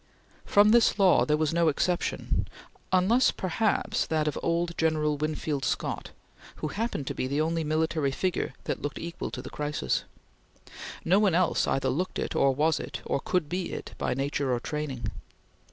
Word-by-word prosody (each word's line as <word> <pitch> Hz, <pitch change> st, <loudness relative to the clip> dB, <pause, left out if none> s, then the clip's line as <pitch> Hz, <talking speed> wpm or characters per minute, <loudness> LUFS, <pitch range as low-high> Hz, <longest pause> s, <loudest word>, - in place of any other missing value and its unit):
From 205 Hz, +1 st, +5 dB
this 235 Hz, -2 st, +5 dB
law 195 Hz, -3 st, +5 dB
there 150 Hz, 0 st, +3 dB
was 155 Hz, 0 st, 0 dB
no 170 Hz, 0 st, +3 dB
exception, 175 Hz, +4 st, 0 dB, 0.4 s
unless, 190 Hz, +8 st, +4 dB
perhaps, 200 Hz, +4 st, 0 dB
that 155 Hz, -1 st, 0 dB
of 150 Hz, -, -1 dB
old 170 Hz, 0 st, 0 dB
General 155 Hz, -2 st, +1 dB
Winfield 150 Hz, -1 st, -2 dB
Scott, -, -, -2 dB, 0.5 s
who 155 Hz, -, -4 dB
happened 210 Hz, -, -2 dB
to -, -, -3 dB
be 130 Hz, -, -2 dB
the 140 Hz, +3 st, -1 dB
only 165 Hz, +1 st, 0 dB
military 155 Hz, -1 st, 0 dB
figure 180 Hz, +6 st, -1 dB
that -, -, -3 dB
looked 145 Hz, -, -4 dB
equal 170 Hz, 0 st, -5 dB
to -, -, -6 dB
the -, -, -8 dB
crisis. 145 Hz, -, -1 dB, 1.0 s
No 185 Hz, +4 st, +4 dB
one 200 Hz, -5 st, +3 dB
else 180 Hz, 0 st, +2 dB
either 135 Hz, -, +1 dB
looked 180 Hz, +7 st, -2 dB
it, -, -, -3 dB
or 140 Hz, -, +4 dB
was 155 Hz, +4 st, +2 dB
it, -, -, -6 dB
or -, -, 0 dB
could 180 Hz, +1 st, 0 dB
be 180 Hz, +2 st, -3 dB
it, -, -, -6 dB
by -, -, 0 dB
nature 140 Hz, 0 st, -1 dB
or 120 Hz, -, +1 dB
training. 135 Hz, -5 st, -4 dB
155 Hz, 175 wpm, -28 LUFS, 145-180 Hz, 1.0 s, From